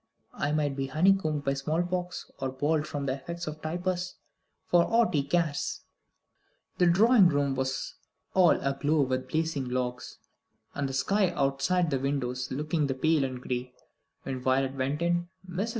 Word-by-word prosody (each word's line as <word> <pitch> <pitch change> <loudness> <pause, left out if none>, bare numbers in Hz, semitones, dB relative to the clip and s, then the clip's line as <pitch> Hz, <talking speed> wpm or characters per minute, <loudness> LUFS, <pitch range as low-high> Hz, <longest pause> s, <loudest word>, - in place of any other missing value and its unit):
I 145 - -1
might 150 -2 0
be 135 -1 -2
honeycombed 155 0 +2
by 135 - +2
the 135 - -2
small 155 +5 0
pox, 180 0 -4
or 135 - -1
bald 150 +3 0
from 145 -1 -4
the 130 - 0
effects 170 +6 -6
of 155 0 -6
typhus, 180 +2 -2 0.5
for 175 -1 +4
aught 230 0 +2
he 145 - +3
cares." 150 0 -1 1.0
The 180 - +5
drawing 200 +2 +6
room 145 -2 +1
was 130 0 -2 0.4
all 180 -3 +5
aglow 145 +2 +1
with 130 -1 -2
blazing 155 -5 -1
logs, 125 0 -3 0.6
and 140 -1 -2
the - - -5
sky 195 +8 +2
outside 145 +4 +1
the 135 - +1
windows 125 -2 -2
looking 150 +2 -1
pale 140 +3 +2
and 130 -1 -3
gray, 125 0 -4 0.5
when 130 -2 -4
Violet 130 +1 +1
went 135 +4 -1
in. 175 0 0 0.2
Mrs. 185 +5 -2
145 Hz, 165 wpm, -28 LUFS, 135-175 Hz, 1.0 s, drawing